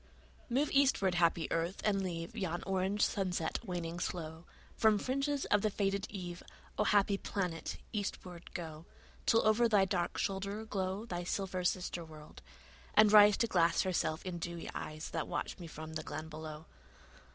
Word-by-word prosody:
Move 270 Hz, +5 st, +1 dB
eastward, 270 Hz, -9 st, +4 dB
happy 170 Hz, -1 st, +2 dB
earth, 170 Hz, +3 st, -1 dB
and 200 Hz, -2 st, +2 dB
leave 170 Hz, +1 st, -4 dB
Yon 175 Hz, -5 st, -2 dB
orange 195 Hz, +2 st, 0 dB
sunset 180 Hz, -5 st, -1 dB
waning 175 Hz, -4 st, -4 dB
slow: 165 Hz, -1 st, -4 dB, 0.3 s
From 220 Hz, -1 st, +4 dB
fringes 275 Hz, +4 st, -1 dB
of 205 Hz, -, +5 dB
the 215 Hz, -, +2 dB
faded 200 Hz, -1 st, -1 dB
eve, 180 Hz, -3 st, -6 dB, 0.4 s
O, 210 Hz, -, +3 dB
happy 200 Hz, -1 st, +3 dB
planet, 180 Hz, -5 st, -3 dB, 0.2 s
eastward 185 Hz, -4 st, -5 dB
go; 160 Hz, -1 st, -6 dB, 0.4 s
Till 230 Hz, -2 st, +4 dB
over 230 Hz, +2 st, +4 dB
thy 205 Hz, -3 st, +5 dB
dark 180 Hz, -2 st, -1 dB
shoulder 200 Hz, +2 st, -2 dB
glow 195 Hz, 0 st, -2 dB
Thy 175 Hz, -6 st, -4 dB
silver 185 Hz, 0 st, -2 dB
sister 180 Hz, -1 st, -1 dB
world, 155 Hz, -2 st, -12 dB, 0.5 s
and 215 Hz, -1 st, +7 dB
rise 210 Hz, -1 st, +9 dB
To -, -, +3 dB
glass 175 Hz, -6 st, +3 dB
herself 175 Hz, -3 st, -1 dB
in 180 Hz, -2 st, -4 dB
dewy 170 Hz, 0 st, -5 dB
eyes 155 Hz, 0 st, -5 dB
That 165 Hz, -, -2 dB
watch -, -, -3 dB
me 170 Hz, -, -7 dB
from 160 Hz, 0 st, -8 dB
the 155 Hz, -, -3 dB
glen 155 Hz, 0 st, -6 dB
below. 155 Hz, 0 st, -7 dB
185 Hz, 165 wpm, -34 LUFS, 170-205 Hz, 0.5 s, rise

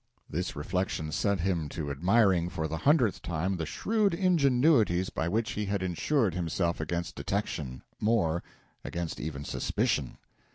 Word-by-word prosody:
This 90 Hz, +2 st, -3 dB
reflection 80 Hz, 0 st, -2 dB
set 100 Hz, +3 st, +1 dB
him 85 Hz, -5 st, 0 dB
to 75 Hz, -2 st, -4 dB
admiring, 90 Hz, +3 st, +3 dB
for 80 Hz, -3 st, -2 dB
the 80 Hz, +1 st, -3 dB
hundredth 130 Hz, -, +3 dB
time, 90 Hz, +3 st, -1 dB
the 80 Hz, -2 st, -3 dB
shrewd 210 Hz, -, +1 dB
ingenuities 140 Hz, -, +3 dB
by 80 Hz, -, -1 dB
which 115 Hz, +5 st, 0 dB
he 105 Hz, -, -2 dB
had 100 Hz, -1 st, -1 dB
insured 100 Hz, -, +1 dB
himself 85 Hz, 0 st, -1 dB
against 85 Hz, +2 st, -2 dB
detection 75 Hz, -10 st, -3 dB, 0.2 s
more, 100 Hz, -7 st, +2 dB, 0.4 s
against 85 Hz, -1 st, -4 dB
even 75 Hz, -2 st, -5 dB
suspicion. -, -, -1 dB
90 Hz, 140 wpm, -29 LUFS, 80-110 Hz, 0.4 s, admiring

